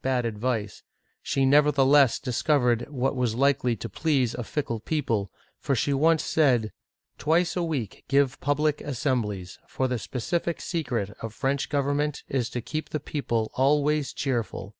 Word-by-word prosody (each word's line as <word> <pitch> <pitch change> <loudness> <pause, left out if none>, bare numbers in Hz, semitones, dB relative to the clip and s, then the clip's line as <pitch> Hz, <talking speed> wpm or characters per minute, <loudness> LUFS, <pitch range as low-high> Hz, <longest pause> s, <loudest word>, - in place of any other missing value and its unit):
bad 130 -2 +1
advice, 110 -2 -2 0.4
she 135 - 0
nevertheless 140 -1 +5
discovered 125 -2 +1
what 135 -1 -1
was 125 -3 0
likely 135 -2 +2
to 115 - -6
please 130 - 0
a 120 - -4
fickle 120 -2 -3
people, 115 - -1 0.3
for 140 - 0
she 140 +4 +1
once 160 +3 +3
said: 125 -8 +2 0.2
" - - -55
Twice 170 +3 +2
a 180 - 0
week 150 - -3
give 140 -1 +2
pub 145 +1 0
lic 150 -1 +1
assemblies, 115 -9 -2
for 130 - -1
the 125 -2 -2
specific 130 - -2
secret 120 - -2
of 115 -1 -6
French 135 0 -1
government 145 +1 0
is 125 -3 -1
to 120 - -4
keep 155 +5 -5
the 155 - -2
people 120 -7 -2
always 145 +1 +2
cheerful. 120 -7 -3
135 Hz, 160 wpm, -26 LUFS, 120-150 Hz, 0.4 s, nevertheless